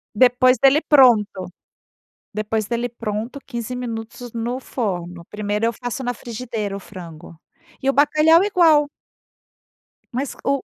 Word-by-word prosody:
Depois 255 +2 +4
dele 275 +3 +5
pronto. 220 - +4 0.9
Depois 215 +1 -2
dele 240 +2 -2
pronto, 230 +3 -5
15 235 -1 -5
minutos 240 -1 -6
no 240 +3 -3
forno, 180 -9 -4
primeiro 210 +1 -2
eu 230 - +1
faço 245 +2 -5
na 245 0 -1
frigideira, 225 -3 -5
o - - -5
frango. 170 -4 -11 0.5
E 270 - +2
o - - -1
bacalhau, 310 +5 +4
igual. 325 -7 +4 1.2
Mas 265 +3 -3
o 275 0 0
240 Hz, 130 wpm, -21 LUFS, 210-265 Hz, 1.2 s, dele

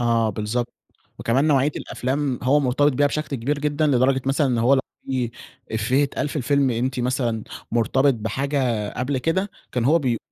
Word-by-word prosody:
آه 115 -2 +2
بالضبط، 110 +4 -3 0.4
وكمان 130 +5 +1
نوعية 145 -1 +3
الأفلام 135 0 -2
هو 140 +4 +4
مرتبط 140 +2 +2
بيها 145 +3 +3
بشكل 145 -1 -2
كبير 140 +5 -1
جدًا 150 +1 0
لدرجة 130 -1 +2
مثلًا 140 +1 +2
إن 120 -3 0
هو 125 +4 +4
لو 135 - +3 0.3
في 125 -3 -1 0.4
إفية 120 +6 +2
إتقال 145 +1 -2
في 150 - -6
الفيلم 140 0 +2
أنتِ 125 +2 -1
مثلًا 120 -3 -1 0.3
مرتبط 130 +4 +3
بحاجة 120 0 -1
قبل 130 +2 -1
كده، 190 +9 0 0.2
كان 125 -2 0
هو 160 +5 +5
بي 125 -6 0
130 Hz, 175 wpm, -23 LUFS, 120-145 Hz, 0.4 s, هو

